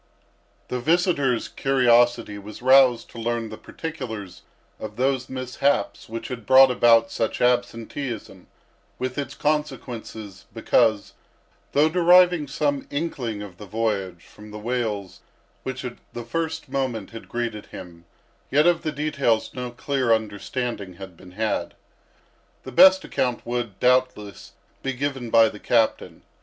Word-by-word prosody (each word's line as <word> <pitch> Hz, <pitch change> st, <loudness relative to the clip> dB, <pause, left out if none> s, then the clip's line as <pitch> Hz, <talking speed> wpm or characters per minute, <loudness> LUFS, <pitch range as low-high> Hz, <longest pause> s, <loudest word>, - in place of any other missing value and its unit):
The 125 Hz, -, -2 dB
visitor's 145 Hz, -4 st, +1 dB
curiosity 120 Hz, -5 st, +2 dB
was 105 Hz, +3 st, -11 dB
roused 130 Hz, -2 st, +5 dB
to 115 Hz, -, -9 dB
learn 115 Hz, -1 st, -2 dB
the 110 Hz, -, -7 dB
particulars 115 Hz, -, -7 dB, 0.4 s
of 105 Hz, -1 st, -7 dB
those 130 Hz, +1 st, 0 dB
mishaps 130 Hz, -3 st, -1 dB
which 115 Hz, 0 st, -6 dB
had 120 Hz, -5 st, -7 dB
brought 130 Hz, 0 st, +8 dB
about 115 Hz, -2 st, +4 dB
such 115 Hz, -, -2 dB
absenteeism, 120 Hz, -4 st, -2 dB, 0.5 s
with 130 Hz, +2 st, -3 dB
its 140 Hz, 0 st, -5 dB
consequences; 125 Hz, -9 st, -4 dB
because, 110 Hz, -2 st, +2 dB, 0.6 s
though 150 Hz, +2 st, +4 dB
deriving 175 Hz, -1 st, +5 dB
some 140 Hz, 0 st, -1 dB
inkling 125 Hz, -9 st, -3 dB
of 95 Hz, -4 st, -11 dB
the 105 Hz, -, -9 dB
voyage 100 Hz, -5 st, -2 dB
from 105 Hz, 0 st, -14 dB
the 105 Hz, -, -8 dB
wails 105 Hz, -4 st, -3 dB, 0.4 s
which 130 Hz, 0 st, -5 dB
at 125 Hz, -, -6 dB, 0.2 s
the 120 Hz, -1 st, -6 dB
first 160 Hz, +4 st, -3 dB
moment 130 Hz, -6 st, -3 dB
had 115 Hz, 0 st, -10 dB
greeted 115 Hz, -3 st, -4 dB
him, 85 Hz, -2 st, -11 dB, 0.4 s
yet 150 Hz, +3 st, +3 dB
of 175 Hz, -1 st, +3 dB
the 155 Hz, -, -2 dB
details 140 Hz, -6 st, 0 dB
no 125 Hz, -1 st, -5 dB
clear 130 Hz, 0 st, -1 dB
understanding 110 Hz, -1 st, -2 dB
had 95 Hz, -1 st, -10 dB
been 90 Hz, +2 st, -15 dB
had. 110 Hz, +2 st, -2 dB, 0.9 s
The 130 Hz, -, -8 dB
best 190 Hz, +8 st, +7 dB
account 125 Hz, -2 st, -2 dB
would, 120 Hz, -5 st, -4 dB
doubtless, 125 Hz, -5 st, 0 dB, 0.3 s
be 135 Hz, -, -2 dB
given 135 Hz, -2 st, -3 dB
by 115 Hz, 0 st, +6 dB
the 105 Hz, -, -11 dB
captain. 115 Hz, 0 st, 0 dB
120 Hz, 135 wpm, -24 LUFS, 110-135 Hz, 0.9 s, brought